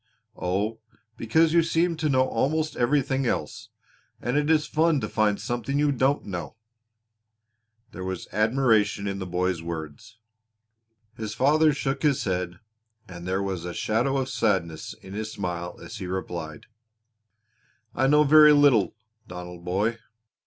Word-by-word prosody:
"Oh, 100 +5 -2 0.4
because 160 +8 +2
you 170 - +6
seem 165 +1 +1
to 155 -1 0
know 130 -1 +3
almost 155 +7 -1
everything 135 +1 +1
else, - - -3 0.5
and 120 +2 -2
it 150 +1 +1
is 155 -2 +3
fun 155 0 +2
to 105 - -2
find 105 -2 +1
something 120 +3 -2
you 145 0 +2
don't 135 +2 +1
know." 90 0 -6 1.4
There 95 - -7
was 95 0 -5
admiration 110 -3 +2
in 100 0 -3
the 95 - -5
boy's 90 -1 -1
words. 85 - -7 1.0
His 110 -1 -5
father 150 +5 +4
shook 135 -1 -2
his 145 -4 +2
head 90 -2 -2 0.5
and 90 -1 -9
there 95 +1 0
was 95 -3 -3
a 90 0 -6
shadow 120 +5 0
of 130 -1 -2
sadness 90 -8 -1
in 95 - -10
his 110 +1 -4
smile 90 -3 -4
as - - -9
he 90 - -6
replied: 85 -4 -5 1.3
"I 135 +2 +1
know 150 +2 +5
very 150 +1 +7
little, 135 - +4 0.3
Donald 90 -1 -9
boy. 105 +6 -1
110 Hz, 145 wpm, -25 LUFS, 90-140 Hz, 1.4 s, very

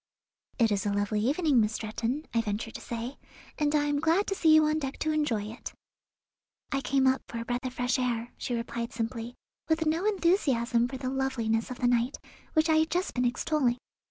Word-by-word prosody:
"It 230 -3 +3
is 205 0 0
a - - +1
lovely 205 +1 0
evening, 280 +1 +3
Miss 215 0 +1
Stretton," 230 +7 -3
I 230 - +3
ventured 220 +1 -3
to - - -7
say, 235 +3 -5 0.4
"and 295 0 +2
I 295 - +3
am 290 -1 0
glad 330 +6 +2
to - - -1
see 325 -4 +3
you 310 0 +6
on 305 +1 +1
deck 270 -2 -4
to 310 - 0
enjoy 295 -9 0
it." 220 +4 -8 1.0
"I 275 -1 0
came 270 0 +2
up 260 0 +3
for 235 - -6
a 230 - -4
breath 245 +2 -2
of 250 - -7
fresh 245 +1 0
air," 240 -1 -1
she 245 - -3
replied 235 0 -4
simply, 230 +1 -4 0.3
with 320 0 +2
no 325 +5 +1
enthusiasm 270 - +2
for 265 - -6
the 255 -1 -3
loveliness 235 -5 0
of 250 - -6
the 245 - +1
night, 245 +2 +1 0.4
which 315 0 +3
I 315 -1 +4
had 315 +1 +3
just 360 +3 -1
been 250 0 0
extolling. 245 0 +1
250 Hz, 215 wpm, -29 LUFS, 230-305 Hz, 1.0 s, you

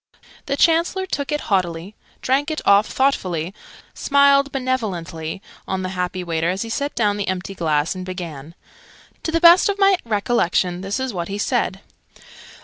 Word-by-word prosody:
The 280 - -1
Chancellor 340 +4 +2
took 285 -6 -3
it 295 - -1
haughtily, 180 -1 -1 0.3
drank 275 +4 +1
it 310 - -2
off 200 +1 +5
thoughtfully, 185 - 0 0.4
smiled 280 0 +3
benevolently 195 - -3 0.2
on 190 0 -2
the 185 - -3
happy 180 0 -3
waiter 165 -1 -1
as 190 +3 -1
he 230 - -7
set 285 +4 -2
down 205 -3 +1
the 205 - -3
empty 185 +1 -3
glass, 155 -3 0
and 185 -1 -6
began. 170 -4 -7 0.7
To 320 - -3
the 330 - +1
best 345 +3 +7
of 405 - -1
my 390 -2 +4
recollection 200 -5 0
this 195 +5 -3
is 260 -3 -3
what 170 -2 -3
he 200 - -4
said. 205 -3 -1
200 Hz, 165 wpm, -21 LUFS, 180-280 Hz, 0.7 s, best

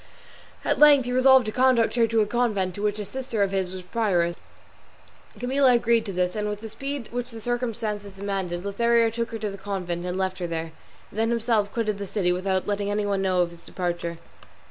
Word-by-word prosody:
At - - +1
length 290 -3 +7
he 245 - -3
resolved 260 0 +6
to 215 - -2
conduct 250 -1 +3
her 235 -1 +3
to 225 0 +2
a - - +3
convent 210 -5 0
of 205 - -5
which 210 0 0
a 210 - -4
sister 250 -3 -2
of 195 - 0
his 190 -2 -1
was 185 -1 -7
prioress; 180 -4 0 1.0
Camilla 260 +1 +3
agreed 230 -1 +2
to - - -3
this, 180 -1 -1
and 210 -1 -1
with 210 0 -5
the 225 - -7
speed 275 +2 -5
which 245 +1 -3
the 230 -2 -8
circumstances 225 -4 -3
demanded, 190 -2 -3
Lothario 230 +3 +2
took 230 0 -3
her 225 - -5
to 210 -2 -3
the 195 - -9
convent 185 -3 -3
and 180 +1 -3
left 190 0 -1
her 175 - -2
there, 165 -1 -4 0.4
and 215 - -6
then 225 0 +2
himself 225 -3 +1
quitted 215 -3 -1
the 200 - -4
city 180 -2 0
without 185 +1 0
letting 205 0 -1
anyone 205 -1 0
know 185 -2 +2
of 170 - -4
his 170 - -14
departure. 175 -2 -3
210 Hz, 215 wpm, -25 LUFS, 190-235 Hz, 1.0 s, length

